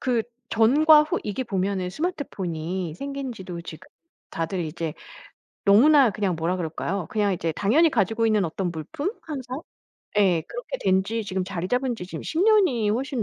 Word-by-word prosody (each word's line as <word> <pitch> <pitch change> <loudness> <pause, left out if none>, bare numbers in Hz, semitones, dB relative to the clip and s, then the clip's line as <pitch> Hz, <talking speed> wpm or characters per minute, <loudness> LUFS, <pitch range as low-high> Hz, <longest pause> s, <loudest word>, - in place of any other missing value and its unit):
그 245 -3 +1 0.3
전과 300 +7 +6
후 310 - -1
이게 210 +5 -3
보면은 190 -3 -1
스마트폰이 185 - -3
생긴지도 245 -10 -6
지금 165 - -10 0.4
다들 165 +3 -3
이제 155 0 -4 0.7
너무나 260 +6 +6
그냥 195 -4 -1
뭐라 165 +3 -1
그럴까요. 175 +2 -3
그냥 205 -2 +1
이제 165 -2 -2
당연히 270 - +3
가지고 225 0 +1
있는 210 -3 +2
어떤 175 +2 -3
물품, 170 - -4
항상? 270 -2 -6 0.6
예 185 -5 +4
그렇게 - - -6
된 190 0 +3
지 225 +2 -2
지금 190 -1 -2
자리 185 -1 -4
잡은 250 0 0
지 180 -5 -8
지금 165 -4 -7
10 325 - -2
년이 370 - +4
훨씬 250 +2 -1
205 Hz, 325 characters per minute, -25 LUFS, 180-265 Hz, 0.7 s, 전과